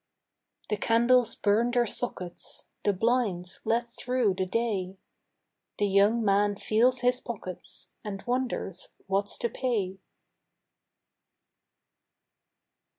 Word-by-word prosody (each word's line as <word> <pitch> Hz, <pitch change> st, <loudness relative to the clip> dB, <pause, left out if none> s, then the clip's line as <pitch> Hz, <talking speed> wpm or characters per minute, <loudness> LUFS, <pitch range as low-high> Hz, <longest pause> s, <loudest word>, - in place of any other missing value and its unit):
The 210 Hz, -, +1 dB
candles 235 Hz, +2 st, +3 dB
burn 215 Hz, +4 st, +2 dB
their 245 Hz, -1 st, +2 dB
sockets, 185 Hz, -6 st, -3 dB, 0.2 s
The 205 Hz, -, +3 dB
blinds 200 Hz, -4 st, 0 dB
let 235 Hz, +1 st, 0 dB
through 245 Hz, -6 st, +1 dB
the 185 Hz, 0 st, -1 dB
day, 195 Hz, -3 st, -1 dB, 0.8 s
The 205 Hz, -, +2 dB
young 205 Hz, +3 st, +3 dB
man 205 Hz, +1 st, +3 dB
feels 240 Hz, +5 st, +2 dB
his 250 Hz, 0 st, +3 dB
pockets 195 Hz, -6 st, -8 dB
And 195 Hz, -2 st, -5 dB
wonders 245 Hz, -7 st, -2 dB, 0.2 s
what's 195 Hz, +1 st, -1 dB
to 235 Hz, -, -1 dB
pay. 205 Hz, -7 st, -2 dB
215 Hz, 100 wpm, -28 LUFS, 195-240 Hz, 0.8 s, candles